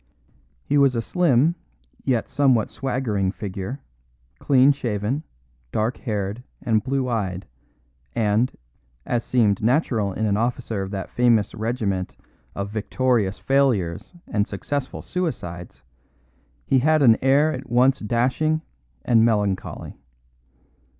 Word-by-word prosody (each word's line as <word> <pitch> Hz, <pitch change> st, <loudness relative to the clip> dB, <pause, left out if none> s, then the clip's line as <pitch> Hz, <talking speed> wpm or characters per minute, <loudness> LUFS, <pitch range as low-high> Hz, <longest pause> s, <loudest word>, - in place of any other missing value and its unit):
He 145 Hz, -, +2 dB
was 135 Hz, -3 st, +4 dB
a 115 Hz, -, 0 dB
slim 160 Hz, -1 st, +3 dB, 0.5 s
yet 125 Hz, -4 st, 0 dB
somewhat 130 Hz, -6 st, +2 dB
swaggering 115 Hz, -8 st, -1 dB
figure, 100 Hz, +6 st, -6 dB, 0.6 s
clean 135 Hz, 0 st, +5 dB
shaven, 120 Hz, 0 st, -2 dB, 0.5 s
dark 110 Hz, +3 st, -1 dB
haired, 105 Hz, 0 st, -3 dB, 0.2 s
and 110 Hz, -4 st, +1 dB
blue 135 Hz, 0 st, -1 dB
eyed, 95 Hz, -6 st, -2 dB, 0.7 s
and, 110 Hz, +2 st, +2 dB, 0.5 s
as 120 Hz, -1 st, -1 dB
seemed 110 Hz, -6 st, +2 dB
natural 115 Hz, -4 st, +1 dB
in 110 Hz, +3 st, -2 dB
an 100 Hz, -1 st, +1 dB
officer 115 Hz, -2 st, -2 dB
of 95 Hz, -, -4 dB
that 95 Hz, -2 st, -5 dB
famous 120 Hz, -4 st, +2 dB
regiment 110 Hz, -5 st, -2 dB, 0.4 s
of 100 Hz, 0 st, -4 dB
victorious 110 Hz, -1 st, 0 dB
failures 120 Hz, -12 st, +1 dB
and 105 Hz, -1 st, -1 dB
successful 135 Hz, +7 st, -4 dB
suicides, 90 Hz, -, -5 dB, 0.8 s
he 135 Hz, -, +3 dB
had 155 Hz, +2 st, +3 dB
an 115 Hz, -4 st, +7 dB
air 140 Hz, +4 st, +4 dB
at 130 Hz, 0 st, -7 dB
once 125 Hz, +3 st, +3 dB
dashing 130 Hz, +8 st, 0 dB, 0.4 s
and 115 Hz, -2 st, +4 dB
melancholy. 105 Hz, -4 st, -1 dB
115 Hz, 115 wpm, -23 LUFS, 105-135 Hz, 0.8 s, an